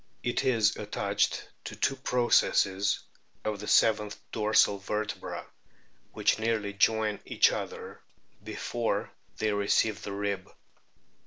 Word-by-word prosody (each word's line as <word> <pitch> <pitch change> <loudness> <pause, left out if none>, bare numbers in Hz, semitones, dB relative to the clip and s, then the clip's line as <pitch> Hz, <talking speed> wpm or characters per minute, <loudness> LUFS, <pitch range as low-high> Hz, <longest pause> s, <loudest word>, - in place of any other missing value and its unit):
It 120 +2 0
is 115 -5 +2
attached 100 -1 -1 0.2
to - - -6
two 135 - +1
processes 110 -6 +2 0.4
of 105 -1 -2
the 105 - -7
seventh 105 -2 +3
dorsal 105 -2 +3
vertebra, 105 +2 -4 0.7
which - - +2
nearly 110 -3 -1
join 105 +1 +2
each - - +3
other - - -6 0.4
before - - -2 0.3
they 110 -1 0
receive 100 +1 +1
the 100 - -5
rib. 100 -1 -3
105 Hz, 110 wpm, -29 LUFS, 100-110 Hz, 0.7 s, seventh